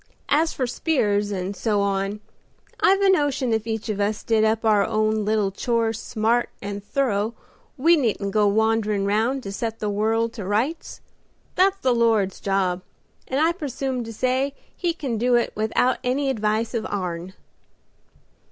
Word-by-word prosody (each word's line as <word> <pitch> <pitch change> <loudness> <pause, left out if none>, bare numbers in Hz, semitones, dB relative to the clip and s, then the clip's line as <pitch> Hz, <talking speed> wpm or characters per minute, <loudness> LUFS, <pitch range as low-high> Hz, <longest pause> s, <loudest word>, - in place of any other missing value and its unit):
As 315 +3 +3
for 260 - -2
'spears' 215 -7 0
and 195 0 -3
so 210 +2 0
on, 200 +1 -1 0.6
I've 390 +1 +4
a 395 - +4
notion 285 -8 +1
if 220 0 -1
each 225 0 -3
of 210 -2 -2
us 205 +1 -1
did 225 -1 +2
up 220 +1 +1
our 210 -2 +4
own 215 0 0
little 210 -2 +1
chores 225 +1 -1
smart 230 +2 0
and 200 0 -6
thorough 225 -2 -1 0.4
we 330 +6 +5
needn't 220 -8 0
go 210 0 +3
wanderin' 215 -1 +1
round 225 +6 +1
to 195 - -5
set 225 +2 -3
the 210 -1 -2
world 225 +2 0
to 215 - -6
rights. 225 - -2 0.5
That's 385 +2 +3
the 260 -10 +1
Lord's 225 -5 +2
job, 190 -2 0 0.5
and 265 - -1
I 320 +2 +4
presume 270 -6 -3
to 225 - -7
say 260 +4 0 0.2
He 345 -3 -1
can 255 -9 -3
do 245 +1 +3
it 240 - +1
without 220 +4 +1
any 270 +2 +1
advice 215 0 -1
of 230 -2 -2
ourn." 180 -1 -4
225 Hz, 165 wpm, -23 LUFS, 205-255 Hz, 0.6 s, we